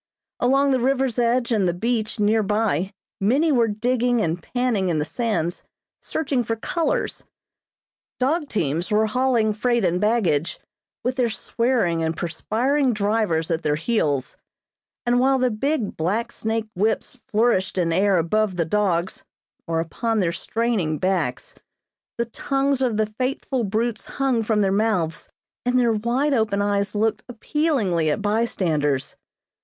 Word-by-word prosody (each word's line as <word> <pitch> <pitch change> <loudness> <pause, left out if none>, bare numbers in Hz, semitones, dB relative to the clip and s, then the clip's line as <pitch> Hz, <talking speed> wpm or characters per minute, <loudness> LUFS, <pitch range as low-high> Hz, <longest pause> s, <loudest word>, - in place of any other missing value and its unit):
Along 275 +3 +3
the 260 - +2
river's 260 -1 +1
edge 240 +1 +1
and 205 -5 +2
the 175 - 0
beach 225 +2 -1
near 215 +2 +3
by 205 -3 0 0.3
many 270 +11 +2
were 240 -4 +3
digging 245 +3 +1
and 170 -3 -1
panning 235 -4 0
in 165 - 0
the 150 - 0
sands 180 -3 -2 0.4
searching 275 -5 -1
for 225 0 -2
"colors." 325 +9 -2 0.9
Dog 295 +4 0
teams 165 -2 -1
were 215 0 +3
hauling 230 -1 +1
freight 235 0 +1
and 180 +1 +1
baggage, 210 -8 +1 0.4
with 255 +1 -1
their 245 -2 +2
swearing 225 -7 0
and 160 0 -1
perspiring 250 - 0
drivers 205 -6 0
at 165 0 0
their 150 -2 +1
heels, 150 - -1 0.7
and 240 0 +3
while 265 +1 +3
the 255 -1 +1
big 245 +1 -1
black 215 +9 -1
snake 220 0 -2
whips 220 +5 -1
flourished 215 -4 +1
in 170 -2 +1
air 195 +2 +3
above 190 +4 +1
the 170 -2 0
dogs 185 -1 0 0.4
or 165 0 0
upon 225 +7 -1
their 175 -3 +1
straining 220 -10 -1
backs, 180 -9 -1 0.6
the 235 - 0
tongues 275 +3 -1
of 240 -5 +1
the 215 - +2
faithful 255 +3 -2
brutes 220 +3 -1
hung 265 -4 0
from 215 -1 +1
their 195 -1 +2
mouths, 195 -6 0 0.3
and 250 +1 +1
their 240 -2 +3
wide 240 +7 0
open 220 -5 +1
eyes 200 0 0
looked 220 0 +1
appealingly 230 - 0
at 150 - 0
bystanders. 170 - 0
220 Hz, 150 wpm, -23 LUFS, 185-245 Hz, 0.9 s, Along